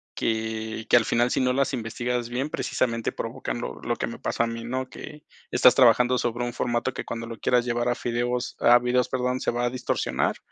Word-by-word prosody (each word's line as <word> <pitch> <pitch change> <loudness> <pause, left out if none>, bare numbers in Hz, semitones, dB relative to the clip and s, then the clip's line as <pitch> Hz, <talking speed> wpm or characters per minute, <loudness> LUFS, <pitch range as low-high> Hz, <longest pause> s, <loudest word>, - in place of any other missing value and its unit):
que 110 0 -2
que - - +7
al 115 - +2
final, 120 +1 +2
si - - 0
no 125 -1 +2
las 135 0 +1
investigas 120 +1 -2
bien, 130 +5 -2
precisamente 115 -5 -1
provocan - - -4
lo 65 - -5
lo - - -1
que - - -3
me - - -7
pasa 115 - 0
a - - -3
mí, 115 0 -5
¿no? 130 +2 -3
Que 150 0 -10 0.3
estás 125 - +6
trabajando 125 0 +5
sobre 120 0 -1
un 120 - -2
formato 120 +2 -1
que, - - -5
cuando 115 0 -5
lo 115 -1 -7
quieras 125 -1 +2
llevar 120 0 0
a 120 - +3
fideos, 120 +1 -2
a 120 +1 +6
videos, 125 0 +1
perdón, 125 0 -1
se - - 0
va 120 0 -1
a 120 - +1
distorsionar 120 - -1
120 Hz, 225 wpm, -25 LUFS, 115-125 Hz, 0.3 s, que